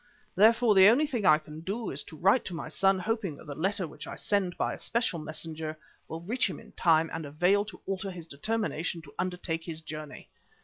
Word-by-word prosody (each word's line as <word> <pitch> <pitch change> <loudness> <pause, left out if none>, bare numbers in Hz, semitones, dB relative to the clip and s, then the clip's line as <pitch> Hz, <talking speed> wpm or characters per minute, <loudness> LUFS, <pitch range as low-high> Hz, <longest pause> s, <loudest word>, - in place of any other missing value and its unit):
Therefore, 225 +2 +5
the 190 -1 +8
only 250 +8 +5
thing 240 -10 -1
I 155 - +8
can 155 0 -10
do 200 +6 -3
is 140 - -2
to 155 - -11
write 195 - +4
to 180 - -4
my 155 -1 -5
son 195 +4 +3
hoping 200 -4 -2
that - - -13
the 145 - -6
letter 190 +4 0
which 150 - -9
I - - -6
send 190 -4 0
by - - 0
a - - -8
special 230 -7 0
messenger 155 0 -4 0.3
will 160 +1 -6
reach 215 +4 0
him - - -6
in - - -15
time 165 -1 +3
and 165 - -3
avail 175 +8 +2
to 215 - -10
alter 195 0 -3
his 175 -3 -8
determination 170 0 -2
to 145 - -14
undertake 180 -3 -2
this 160 -2 -5
journey. 155 -2 -8
180 Hz, 220 wpm, -29 LUFS, 160-205 Hz, 0.3 s, the